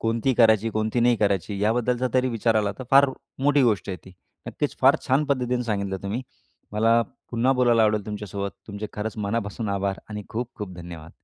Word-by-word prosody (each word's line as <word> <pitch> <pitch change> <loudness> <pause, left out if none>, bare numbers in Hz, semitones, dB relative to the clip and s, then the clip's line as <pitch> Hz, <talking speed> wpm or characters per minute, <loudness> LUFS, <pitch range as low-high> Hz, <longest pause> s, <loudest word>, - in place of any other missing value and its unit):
कोणती 115 +3 0
करायची 110 -1 +4
कोणती 110 +2 -1
नाही 120 0 +4
करायची 100 -1 0
याबद्दलचा 125 +3 +1
तरी 130 0 +3
विचार 115 -1 +1
आला 105 -2 +1
तर 130 - -6
फार 140 +1 +7 0.4
मोठी 145 -1 +4
गोष्ट 110 -5 +1
आहे 95 - -3
ती. 95 - -13 0.3
नक्कीच - - -3
फार - - +6
छान 135 +4 +3
पद्धतीने 125 -3 0
सांगितलं 100 -3 -2
तुम्ही, 105 +6 -3 0.5
मला 115 +2 +4 0.3
पुन्हा 120 +2 +2
बोलायला 120 -3 +3
आवडेल 105 -1 +1
तुमच्या 105 -1 -5
सोबत. 100 0 -3 0.2
तुमचे 100 +1 -5
खरंच 105 +1 -4
मनापासून 105 0 -2
आभार 100 0 -1
आणि 105 -1 -5
खूप-खूप 110 -4 -5
धन्यवाद. 85 -2 -9
110 Hz, 180 wpm, -24 LUFS, 100-120 Hz, 0.5 s, फार